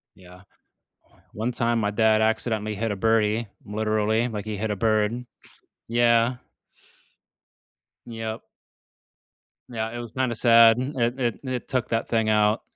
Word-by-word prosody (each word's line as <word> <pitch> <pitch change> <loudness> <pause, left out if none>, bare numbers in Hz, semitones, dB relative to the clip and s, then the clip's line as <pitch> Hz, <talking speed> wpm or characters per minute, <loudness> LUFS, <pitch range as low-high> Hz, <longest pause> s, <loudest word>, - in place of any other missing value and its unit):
Yeah, 90 0 -16 0.9
one 115 +4 -3
time 120 -1 0
my 105 -1 0
dad 110 0 +3
accidentally 110 -1 -1
hit 115 +2 -2
a 100 - -2
birdie, 110 +1 +1 0.2
literally, 110 +2 0
like, 105 -3 -5
he 110 -1 -4
hit 110 +1 -2
a 105 - -1
bird. 110 +3 0 0.6
Yeah. 120 +1 +3 1.7
Yep. 115 -1 -6 1.3
Yeah, 110 -2 -3
it - - -5
was 120 -2 -8
kinda 130 -1 -1
sad. 115 -1 +6 0.2
It 120 +1 -1
it 120 -3 -1
it 130 -2 -4
took 130 -2 -2
that 115 0 -1
thing 110 -2 0
out. 105 +1 +2
110 Hz, 135 wpm, -24 LUFS, 110-120 Hz, 1.7 s, sad